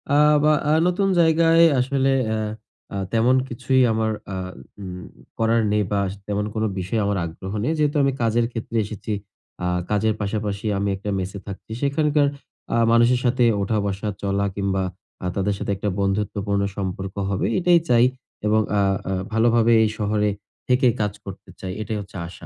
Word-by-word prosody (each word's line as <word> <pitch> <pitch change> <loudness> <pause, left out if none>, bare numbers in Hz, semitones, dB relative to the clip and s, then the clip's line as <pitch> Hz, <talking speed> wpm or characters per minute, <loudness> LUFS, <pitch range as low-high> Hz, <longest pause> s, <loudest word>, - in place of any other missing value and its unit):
আ - - +5 0.3
বা 155 0 +5 0.2
আ - - +5
নতুন 190 +2 +1
জায়গায় 165 0 +5 0.2
আসলে 135 +1 +1 0.2
অ্যা 110 0 -1 0.5
আ - - -4 0.2
তেমন 115 +3 +4
কিছুই 130 +2 +1
আমার 110 0 0 0.2
আ - - -3 0.5
উম 90 -2 -7 0.4
করার 115 +1 +3
নেই 105 0 +2
বা 100 - +2
স - - -6
তেমন 105 0 -1
কোনো 110 0 +1
বিষয়ে 95 +5 -1
আমার 100 0 0
আগ্রহ 90 +4 -7
নেই। 155 +7 +1
যেহেতু 150 0 +2
আমি 135 - +3
কাজের 115 +1 +2
ক্ষেত্রে 115 0 -4
এসেছি, 105 +1 -5 0.5
আ - - 0 0.3
কাজের 110 +1 +2
পাশাপাশি 105 0 -3
আমি 100 +1 0
একটা 100 +2 -6
মেসে 95 +2 -4
থাকছি। 100 +2 -9
সেখানকার 145 +1 +2 0.5
আ - - +3
মানুষের 120 +2 +4
সাথে 125 +1 +2 0.2
ওঠা-বসা, 100 0 -1
চলা 100 0 0
কিংবা 95 -1 0 0.4
আ - - -3
তাদের 100 +1 0
সাথে 100 - -3
একটা 105 +1 -2
বন্ধুত্বপূর্ণ 100 0 0 0.2
সম্পর্ক 95 0 -4
হবে 100 -1 -1 0.2
এটাই 175 -1 +5
চাই। 120 0 +6 0.4
এবং 110 +1 +3 0.2
আ - - +4 0.3
আ - - 0 0.2
ভালোভাবে 115 +1 +3
এই 110 - +2
শহরে 105 0 +1 0.4
থেকে 125 +1 +3
কাজ 105 -2 0
করতে 95 -1 -9
চাই। 95 - -5
এটাই 110 0 -3
হচ্ছে 100 0 -10
আশা। 85 -1 -12
110 Hz, 170 wpm, -23 LUFS, 100-125 Hz, 0.5 s, চাই